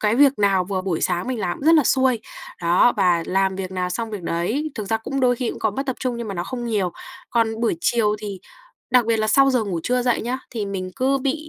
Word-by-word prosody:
cái 210 0 +2
việc 275 0 +4
nào 195 -3 +3
vừa 190 0 -3
buổi 185 -4 -2
sáng 180 +3 0
mình 245 -4 -2
làm 175 -2 -2
cũng 285 - -5
rất 330 - +7
là 300 -5 +5
xuôi. 260 -3 +2 0.4
Đó, 175 +8 +4
và 180 -4 +3
làm 190 0 +1
việc 185 -1 -4
nào 180 -1 -2
xong 225 +4 -3
việc 205 -4 -6
đấy. 220 - -1
Thực 215 - -4
ra 225 - +2
cũng 270 +5 -4
đôi 250 -1 +3
khi 245 -1 -2
cũng - - -8
có 220 - +1
mất 270 +7 -4
tập 260 - -2
trung, 250 -2 -2
nhưng 235 -2 -5
mà 195 - -4
nó 175 - -3
không 250 -2 -5
nhiều. 200 -6 0 0.4
Còn 225 -1 0
buổi 230 -7 +1
chiều 215 -1 +2
thì 200 -3 -6 0.5
đặc 250 -3 +4
biệt 230 - +2
là 215 - +1
sau 275 +3 +5
giờ 250 -4 +1
ngủ 180 -5 -3
trưa 250 +4 +1
dậy 245 -1 +1
nhớ, 245 +3 -3
thì 220 -4 -3
mình 185 -2 -4
cứ 270 +2 +2
bị 290 +4 -2
220 Hz, 270 wpm, -22 LUFS, 190-255 Hz, 0.5 s, rất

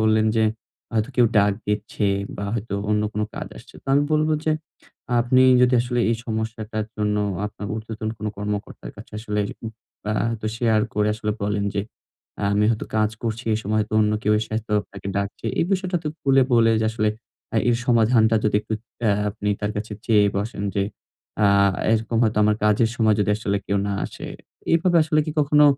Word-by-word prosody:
বললেন 110 0 +3
যে 110 - +4 0.5
হয়তো 110 0 0
কেউ 120 -2 +6
ডাক 100 0 +4
দিচ্ছে 105 0 -1 0.3
বা 100 - -4
হয়তো 110 -3 -3 0.2
অন্য 105 0 +2
কোন 105 - -2
কাজ - - -5
আসছে। - - -14
তো - - -59
আমি 145 - +4
বলব 155 0 +3 0.2
যে 155 - +2 0.7
আপনি 130 +2 +4 0.2
যদি 125 0 +4
আসলে 120 0 -1
এই 115 - +1
সমস্যাটার 110 -1 -3
জন্য 105 -1 0 0.3
আপনার 105 0 -7
উর্ধ্বতন 110 0 -5
কোনো 105 0 -3
কর্মকর্তার 105 0 -5
কাছে - - -12
আসলে 105 -1 -2 0.3
উপ 110 - -6 0.4
আ - - +1 0.2
হয়তো 110 -2 -4
শেয়ার 115 -2 +2
করে 105 0 +2
আসলে 105 0 -3
বলেন 100 0 0
যে, 100 - +1 0.7
আমি 105 +1 +3
হয়তো 110 - -2
কাজ 110 -1 +2
করছি 115 0 -3
এ - - +1
সময় 110 +2 +1
তো - - -14
অন্য 105 0 +2
কেউ 105 - +2
এসে 110 - -4
হয়তো 110 -1 -3
আপনাকে 100 -1 -11
ডাকছে। 100 0 -3
এই - - +3
বিষয়টা 185 -1 0
তো - - 0
খুলে 135 -1 +4
বলে 115 -1 +5
যে - - +1
আসলে 110 -1 0 0.5
আ - - +2
এর 120 - +3
সমাধানটা 115 -1 +4
যদি 105 -1 +3
একটু 110 - -4 0.3
অ্যা 110 -3 +3 0.2
আপনি 105 0 -4
তার 105 0 -1
কাছে 105 +1 -4
চেয়ে 105 -3 +5
বসেন। 100 0 -3
যে 100 - +1 0.6
আ - - +6 0.5
এরকম 115 +1 0
হয়তো 110 -2 +2
আমার 105 0 +3
কাজের 105 +2 +3
সময় 110 -2 +3
যদি 105 - +1
আসলে 100 -2 -1
কেউ 100 - +1
না - - -1
আসে। - - -9 0.5
এভাবে 175 +1 +3
আসলে 155 0 +2
কি 155 - -3
কখনো 150 0 +5
110 Hz, 195 wpm, -23 LUFS, 105-115 Hz, 0.7 s, কেউ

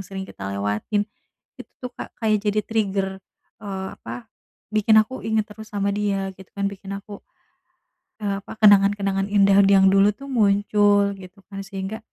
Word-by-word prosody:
sering 190 0 -6
kita 95 - -8
lewatin, 105 - -1 0.6
itu - - -11
tuh 250 -1 -6
Kak - - -9
kayak 215 -2 +2
jadi 210 0 0
trigger, 200 -3 0 0.5
eee, 190 -2 -5
apa, 120 +1 -9 0.4
bikin 215 +1 +4
aku 215 -2 -5
inget 220 0 0
terus 215 0 -12
sama 200 0 0
dia 195 -2 -1
gitu 190 0 -15
kan 200 0 -1
bikin 195 0 -9
aku, 200 0 -9 1.0
eee, 200 -1 -1
apa - - -10
kenangan-kenangan 200 -1 +4
indah 200 -1 +4
yang 195 -1 +6
dulu 200 +1 +4
tuh 275 +4 -10
muncul 205 -2 +3
gitu 190 +1 -14
kan 195 -1 -7
sehingga 195 +2 -5
200 Hz, 160 wpm, -23 LUFS, 195-210 Hz, 1.0 s, yang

